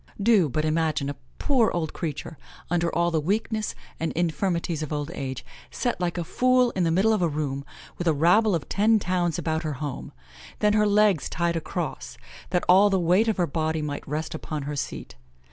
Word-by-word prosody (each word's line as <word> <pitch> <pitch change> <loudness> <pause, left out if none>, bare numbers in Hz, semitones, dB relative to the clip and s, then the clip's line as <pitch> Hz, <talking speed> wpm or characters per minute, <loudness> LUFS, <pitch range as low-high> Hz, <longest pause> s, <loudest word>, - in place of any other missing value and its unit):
Do 200 -6 +4
but 155 +4 -1
imagine 155 -3 0
a - - -8 0.2
poor 250 -6 +2
old 160 -3 -2
creature, 160 -1 -5 0.3
under 170 -1 +1
all 170 0 +2
the 160 -2 +1
weakness 215 +5 -1 0.2
and 165 - -1
infirmities 170 -1 -1
of 155 - -5
old 150 +1 -3
age, 130 -6 -5 0.2
set 245 -6 -2
like 175 0 -1
a 175 - -1
fool 255 +6 +3
in 185 - -1
the 165 - +2
middle 195 +7 +3
of 210 - 0
a 175 - +3
room, 145 -2 -3 0.4
with 175 - -2
a 160 - +4
rabble 180 +7 +4
of 160 - -4
ten 220 +2 +3
towns 180 -4 0
about 160 -1 -1
her 155 -3 -3
home; 145 -1 -5 0.5
then 210 0 +2
her 210 0 +3
legs 205 -5 +3
tied 170 0 0
across, 165 - -4 0.3
that 180 0 0
all 195 +3 +6
the 190 -1 +2
weight 180 +6 +3
of 220 - +1
her 175 - +2
body 160 0 -1
might 145 -1 -5
rest 155 +2 -3
upon 155 -2 -5
her 145 +1 -4
seat. 140 - -5
170 Hz, 200 wpm, -25 LUFS, 155-200 Hz, 0.5 s, all